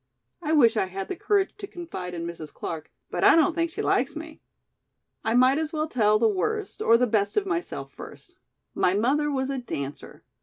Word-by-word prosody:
I 310 -2 -2
wish 235 -7 +5
I 190 - +1
had 190 +1 -6
the - - -2
courage 400 +2 +1
to 400 - -6
confide 255 - -7
in 170 0 -4
Mrs. 165 -3 -7
Clark, 160 -1 -6 0.2
but - - -2
I - - +8
don't 330 +1 +4
think 335 0 0
she - - -4
likes - - +1
me. - - -9 0.8
"I 225 +1 +1
might 255 +4 +5
as 315 -1 -2
well 310 0 -1
tell 215 -7 +3
the 225 +1 +3
worst 415 - -2
or 230 - +5
the 250 - +3
best 210 - 0
of 410 - +2
myself 350 -2 -3
first. 355 - -12 0.4
My 180 - +2
mother 275 +8 +2
was 270 -1 -1
a 270 - -2
dancer. 140 - -6
255 Hz, 205 wpm, -26 LUFS, 200-330 Hz, 0.8 s, I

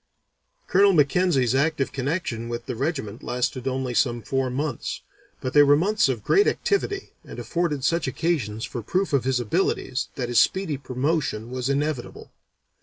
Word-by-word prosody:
Colonel 195 +1 +4
Mackenzie's 145 -4 +3
active 140 0 +1
connection 130 -5 -3
with 120 0 -5
the - - -4
regiment 130 -5 -3
lasted 125 +1 -2
only 130 -1 -2
some 120 +1 +1
four 135 -1 -1
months, 140 0 -3 0.4
but 130 - -3
they 145 - +7
were 145 0 +6
months 200 +1 +2
of 120 -6 -2
great 410 - +4
activity 400 -2 -1
and - - -10
afforded 165 -6 -2
such 165 +1 +1
occasions 130 -7 -1
for 120 - -5
proof 185 - -1
of 135 -3 +2
his 130 -1 +1
abilities 130 - -1
that 125 -4 -3
his 120 - +4
speedy 190 -6 +2
promotion 130 -3 -2
was 130 0 -2
inevitable. 140 -2 -2
135 Hz, 160 wpm, -24 LUFS, 125-165 Hz, 0.4 s, they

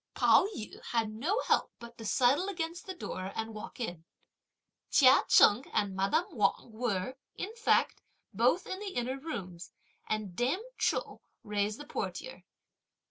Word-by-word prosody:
Pao - - +5
yü 235 - -8
had 225 -2 -1
no 320 - -1
help - - +1
but 235 0 -11
to 225 - -7
sidle 265 - +3
against 340 -2 -4
the 375 - -5
door 185 - -5
and 225 0 -4
walk 215 +3 -9
in. 175 -9 -4 0.9
Chia 265 -1 +6
Cheng 220 +6 +6
and 200 -2 0
madame 195 - +2
Wang 235 - 0
were, 220 +1 -2 0.2
in 425 +4 -5
fact, 465 - +2 0.3
both - - +2
in 375 - -5
the 400 -2 -6
inner 255 +2 -2
rooms, 185 - -6 0.4
and 215 -4 -2
dame 265 - 0 0.2
Chou - - -1 0.2
raised 210 +2 -1
the 295 - -8
portière. - - -5
240 Hz, 150 wpm, -31 LUFS, 210-325 Hz, 0.9 s, Chia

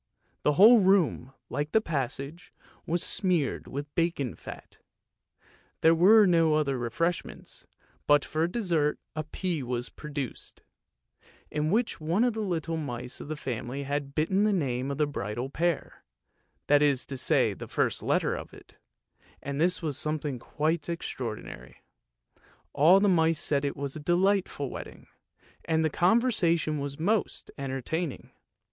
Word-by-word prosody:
The 150 - +2
whole 220 +9 +8
room, 185 -9 +2 0.2
like 145 +3 -3
the 220 - +6
passage, 150 - -4 0.4
was 170 +1 0
smeared 180 -8 0
with 145 +1 -6
bacon 165 -7 -1
fat; - - -11 1.0
there 160 +1 +6
were 205 +6 +6
no 165 -4 +3
other 145 -3 +1
refreshments, 165 +9 -3 0.4
but 145 -1 +4
for 160 +2 0
dessert 170 -8 0 0.2
a 155 - -2
pea 170 +1 -3
was 125 -1 -3
produced, 145 -4 -7 0.9
in 150 +1 -1
which 220 -1 0
one 170 +8 +1
of 245 -2 +2
the 220 - -3
little 165 -4 -2
mice 125 -4 -5
of - - -8
the 155 - -4
family 130 0 -4
had 140 0 -3
bitten 190 +6 +2
the 215 - +3
name 135 -8 -1
of 140 - -3
the 150 - +2
bridal 125 -2 -4
pair; 170 +1 -2 0.6
that 145 0 +4
is 140 -3 +2
to 135 - -6
say 125 - +2
the - - -9
first - - 0
letter - - +1
of - - -8
it, - - -17 0.7
and 140 +1 -3
this 180 +1 +2
was 150 -4 0
something 150 -4 -2
quite 155 +6 -2
extraordinary. 115 - -6 0.9
All 170 +7 +6
the 205 - +3
mice 165 -3 +3
said 145 -4 +2
it 140 - -2
was 140 -1 -4
a - - -5
delightful 175 -3 +1
wedding, - - -9 0.6
and 160 -1 +1
the 155 - 0
con 185 +9 +4
versation 165 - 0
most 210 +2 0
entertaining. 140 +4 -4
155 Hz, 150 wpm, -28 LUFS, 140-175 Hz, 1.0 s, whole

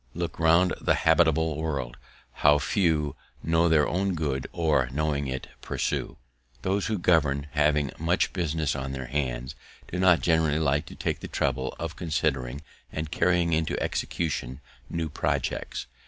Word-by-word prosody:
"Look 85 -1 -4
round 85 +3 +4
the - - +3
habitable 80 -1 +3
world, 70 -6 -3 0.5
how 75 0 +6
few 75 -4 +1 0.3
Know 85 +1 +3
their 75 -2 +4
own 95 +1 0
good, 70 -5 -2
or, 75 -7 +1
knowing 70 0 -1
it, 65 0 -4
pursue!" - - -2 0.5
Those 100 +1 0
who 110 - 0
govern, 75 -6 +2
having 75 -2 +2
much 85 +4 +1
business 80 -4 -1
on 65 -1 -4
their 65 -1 -4
hands, 65 -1 -2 0.4
do 90 - -2
not 90 -2 +5
generally 80 -3 +2
like 75 -2 +1
to - - -10
take - - -2
the - - -7
trouble 65 0 -1
of 85 0 -5
considering 75 -5 -1 0.3
and 75 0 -4
carrying 85 -2 +2
into 80 0 0
execution 70 -5 -2 0.3
new 85 -1 -2
projects. 75 - -2
80 Hz, 150 wpm, -27 LUFS, 70-85 Hz, 0.5 s, how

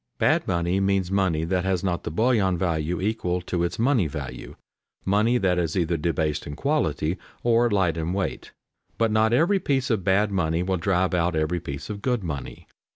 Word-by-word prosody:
"Bad" - - +2
money 85 +1 0
means 95 -2 +1
money 95 -5 +1
that 90 +1 0
has 95 -1 0
not 90 -2 -1
the - - -4
bullion 105 -1 +2
value 85 -1 -1
equal 95 -3 -1
to 90 0 -2
its 85 - -2
money 120 - +2
value, 70 - -7 0.5
money 105 +5 +3
that 90 -5 +1
is 85 +1 -1
either 85 -1 +1
debased 80 -1 -1
in 75 - -6
quality 90 - 0 0.2
or 120 0 +3
light 95 -6 +1
in 80 +1 -2
weight. 95 +1 -3 0.5
But 115 -1 +2
not 110 +1 +3
every 170 +11 +3
piece 135 -6 0
of 105 -5 0
bad 100 +3 +2
money 85 -3 0
will 95 0 0
drive 90 +1 +1
out 85 -1 +1
every 80 +3 0
piece 70 -4 -6
of 100 -1 -6
good 125 -4 0
money. 75 -6 -6
95 Hz, 190 wpm, -25 LUFS, 85-105 Hz, 0.5 s, money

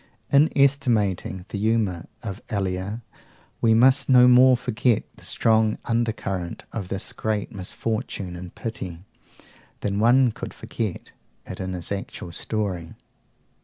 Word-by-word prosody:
In 145 +3 +6
estimating 115 -10 +2
the 100 - -4
humour 105 -6 0 0.2
of 100 -2 -5
Elia, 100 +2 -2 0.6
we 110 -1 +4
must 130 +5 +4
no 125 -1 +8
more 125 +1 +7
forget 120 0 +1
the - - -16
strong 110 -1 +2
undercurrent 110 -7 -2
of 100 -5 -4
this 95 +1 -2
great 110 -1 -2
misfortune 100 -1 -4
and 90 0 -9
pity, 95 -6 -6 0.8
than 100 0 -1
one 120 +3 +5
could - - -8
forget 110 -6 -5 0.3
it - - -8
in 95 0 -3
his 90 0 -6
actual 100 -3 -5
story. 90 -3 -3
110 Hz, 130 wpm, -24 LUFS, 95-120 Hz, 0.8 s, no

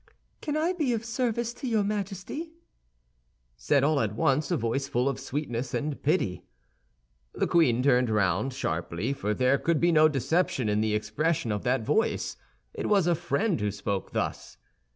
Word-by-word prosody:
"Can 300 -1 -2
I 330 +4 +1
be 300 -9 0
of 225 0 -3
service 235 -1 -1
to 245 +2 -6
your 220 -3 +2
Majesty?" 205 - -4 1.0
said - - +2
all 150 0 +3
at 110 -4 -1
once 135 +5 +1
a - - +1
voice 120 +4 -1
full 125 0 0
of 135 - -1
sweetness 130 -3 -3
and 145 -1 -3
pity. 140 - 0 0.9
The - - +1
queen 125 -8 +3
turned 125 -2 +4 0.4
sharply 85 - -3
round, - - -11
for 105 +1 -1
there 130 +2 +2
could 170 -2 +1
be 170 0 +3
no 155 -1 +6
deception 135 -3 0
in 105 +1 +1
the 110 -1 +1
expression 110 +5 -1
of 105 -1 -1
that 125 -1 +1
voice; 220 - 0 0.4
it - - -3
was 200 -4 +4
a 175 - +3
friend 170 +5 0
who 105 - +1
spoke 100 -1 -3
thus. - - -3
140 Hz, 175 wpm, -27 LUFS, -, 1.0 s, no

